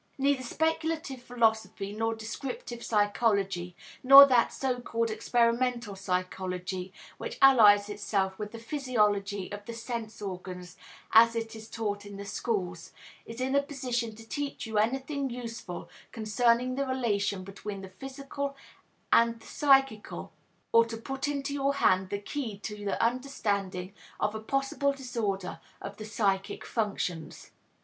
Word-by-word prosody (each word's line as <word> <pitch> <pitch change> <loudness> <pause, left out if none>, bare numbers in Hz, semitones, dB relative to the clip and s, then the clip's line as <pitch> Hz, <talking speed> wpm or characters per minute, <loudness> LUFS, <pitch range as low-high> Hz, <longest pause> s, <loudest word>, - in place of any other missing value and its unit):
Neither 275 -1 +2
speculative 320 0 -1
philosophy 220 -4 0
nor 225 +1 -1
descriptive 240 - -6
psychology 200 -4 +1 0.3
nor 275 +2 +11
that 250 -4 +3
so 255 -2 -1
called 230 -1 -1
experimental 235 0 +1
psychology 185 -1 -3 0.3
which - - -5
allies 210 -7 +7
itself 200 -2 -1
with 210 -1 -4
the 230 - -8
physiology 210 -7 0
of 205 0 -6
the 235 - -5
sense 230 -2 -5
organs 180 -2 -7 0.4
as 230 +1 +7
it 225 0 -3
is 220 0 -10
taught 205 -2 -3
in 205 -1 -9
the 200 - -7
schools, 185 -5 -3 0.3
is 230 +1 -8
in 260 +1 0
a 280 - +5
position 250 -5 -3
to 225 +1 -13
teach 285 +1 -4
you 220 -2 0
anything 270 +5 0
useful 230 -7 -6 0.2
concerning 235 +2 +2
the 275 +1 -1
relation 205 -7 0
between 195 +1 -7
the 190 - -9
physical 275 +5 -6 0.6
and 230 0 +4
the 225 - -17
psychical 270 -6 +2 0.4
or 230 - +7
to 230 0 -6
put 270 +5 -4
into 280 -1 -2
your 280 0 +1
hand 185 -8 +3
the 200 - -1
key 220 +1 -4
to 210 +1 -6
the 200 - -1
understanding 200 -7 -1 0.3
of 210 - 0
a 220 - -4
possible 275 +4 0
disorder 225 -8 -3 0.2
of 200 - -8
the 215 - -7
psychic 195 -3 -1
functions. 195 -7 -3
225 Hz, 140 wpm, -29 LUFS, 200-255 Hz, 0.6 s, nor